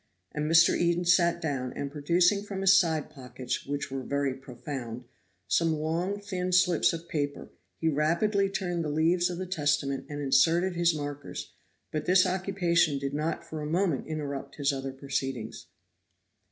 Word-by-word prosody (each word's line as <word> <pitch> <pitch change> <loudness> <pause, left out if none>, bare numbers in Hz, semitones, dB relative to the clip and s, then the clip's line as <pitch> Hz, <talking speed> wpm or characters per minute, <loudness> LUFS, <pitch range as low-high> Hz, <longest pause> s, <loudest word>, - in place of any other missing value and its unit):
And 150 0 -2
Mr. 165 +1 +6
Eden 175 0 +1
sat 175 -1 +4
down, 135 -5 -2
and 140 -1 -4
producing 175 +7 +2
from 200 -2 -5
his 195 0 +6
side 160 -6 +2
pockets, 125 -3 -6
which 140 -1 -3
were 135 0 -3
very 140 +1 -1
profound, 125 -2 -7 0.4
some 165 -1 +2
long 170 +6 -2
thin 185 -3 -3
slips 180 -2 +4
of 165 0 -6
paper, 145 -3 -3 0.3
he 165 - -1
rapidly 170 +7 +2
turned 175 -3 -2
the 155 - -2
leaves 170 +4 +2
of 175 - -4
the 185 - -4
Testament 145 -5 -1
and 145 0 -5
inserted 165 +6 +3
his 170 -1 +2
markers; 145 -1 -6 0.4
but 155 -1 -3
this 185 +1 +5
occupation 180 -5 +1
did 140 0 -3
not 155 +3 -2
for 155 -1 -6
a 150 - -4
moment 170 -3 0
interrupt 140 -3 -5
his 140 -1 +1
other 135 0 -4
proceedings. 135 -4 -4
155 Hz, 165 wpm, -28 LUFS, 140-175 Hz, 0.4 s, Mr